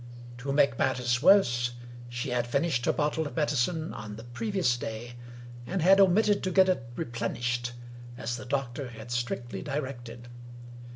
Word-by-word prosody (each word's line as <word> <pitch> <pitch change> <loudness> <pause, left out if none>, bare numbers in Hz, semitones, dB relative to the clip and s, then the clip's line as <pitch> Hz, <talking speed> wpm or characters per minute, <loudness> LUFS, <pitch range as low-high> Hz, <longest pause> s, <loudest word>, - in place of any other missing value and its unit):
To 135 +2 -3
make 140 -4 +3
matters 125 -2 +1
worse, 120 -11 +5 0.4
she 120 +1 -4
had 120 -1 0
finished 140 0 0
her - - +5
bottle 150 +1 0
of - - -9
medicine 155 +2 0
on 105 -1 -7
the 115 - -9
previous 165 - 0
day, 120 0 -6 0.5
and 195 - -1
had 195 +3 +7
omitted 200 +2 +4
to 185 - -1
get 190 +1 +5
it 130 -10 -1
replenished, 120 0 -2 0.4
as 120 -1 -3
the - - -8
doctor 135 0 -2
had 115 0 -10
strictly 120 -3 -3
directed. 120 -4 -5
125 Hz, 155 wpm, -28 LUFS, 120-155 Hz, 0.5 s, had